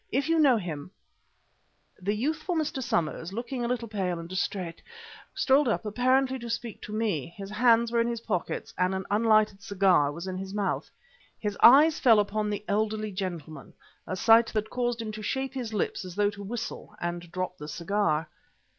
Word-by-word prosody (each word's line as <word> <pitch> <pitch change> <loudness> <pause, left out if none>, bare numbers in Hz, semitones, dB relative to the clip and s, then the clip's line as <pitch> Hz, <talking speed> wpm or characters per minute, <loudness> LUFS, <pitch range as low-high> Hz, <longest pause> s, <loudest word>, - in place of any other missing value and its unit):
If 275 +3 0
you 330 0 +3
know 275 -6 +5
him 165 -6 -5 0.6
" - - -36
The 205 +3 0
youthful 315 - -1
Mr. 300 -4 -1
Somers, 170 -5 -1
looking 245 +3 -4
a - - 0
little 240 -1 -2
pale 190 -5 -2
and 165 0 -7
distrait, 185 -2 -3 0.5
strolled 275 +1 +3
up 225 - 0
apparently 255 +4 +2
to 235 -1 -7
speak 230 -1 -4
to - - -8
me; 215 - -1
his 195 0 -7
hands 230 +1 +4
were 235 -1 +3
in 230 - +1
his 235 -1 -3
pockets 190 -7 -3
and 185 +1 +2
an 190 - -4
unlighted 215 -2 +3
cigar 185 -7 +3
was 170 +4 -7
in 185 -1 -4
his 195 +1 -6
mouth. 205 -2 -1 0.5
His 210 -2 -2
eyes 300 +5 +7
fell 230 -5 +6
upon 210 +1 0
the 205 0 -4
elderly 215 +1 -1
gentleman, 170 -6 -6 0.3
a 185 - -2
sight 225 +4 +6
that 215 0 -2
caused 240 -1 -1
him 225 -2 -4
to 215 0 -7
shape 265 +4 -2
his 250 -4 -4
lips 210 -2 -2
as 180 -2 -8
though 205 0 +2
to 205 0 -10
whistle 220 0 -6
and 175 0 -4
drop 185 0 -4
the 150 - -7
cigar. 170 -2 0
210 Hz, 190 wpm, -28 LUFS, 185-235 Hz, 0.6 s, eyes